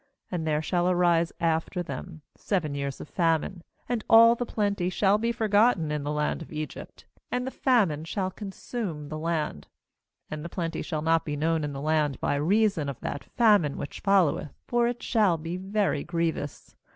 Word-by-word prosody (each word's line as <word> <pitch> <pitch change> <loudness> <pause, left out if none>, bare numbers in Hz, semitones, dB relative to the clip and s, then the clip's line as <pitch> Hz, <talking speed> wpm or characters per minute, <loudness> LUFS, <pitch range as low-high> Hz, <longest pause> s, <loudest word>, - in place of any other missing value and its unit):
80And 165 -3 -2
there 155 0 0
shall 175 +2 +1
arise 175 -2 +3
after 165 +2 0
them 165 -2 -7
seven 165 -8 -1
years 140 -1 -3
of - - -8
famine; 165 +1 0 0.2
and 235 -3 -1
all 230 +1 +8
the 240 0 -3
plenty 200 -4 0
shall 200 +2 +2
be 230 +1 0
forgotten 210 -7 +2
in 150 -1 -1
the 145 - -2
land 150 +2 -1
of 160 - -10
Egypt; 155 -1 -7 0.3
and 250 0 -1
the 260 - -3
famine 200 - +2
shall 185 +3 -2
consume 195 -6 -5
the 155 0 -5
land; 155 - -2 0.6
31and 155 0 -4
the 170 - -6
plenty 165 -2 -3
shall 155 -3 -3
not 165 0 +3
be 150 -2 -3
known 160 +1 0
in 145 - -2
the 135 - -5
land 150 -3 +1
by - - 0
reason 170 +1 +2
of 135 - -6
that 145 - -4
famine 205 - +3
which 140 - -6
followeth; 185 -7 +2
for 240 -1 +2
it 240 0 -4
shall 210 -8 +3
be 165 +2 -5
very 195 -4 0
grievous. 165 -4 -3
170 Hz, 185 wpm, -27 LUFS, 155-205 Hz, 0.6 s, all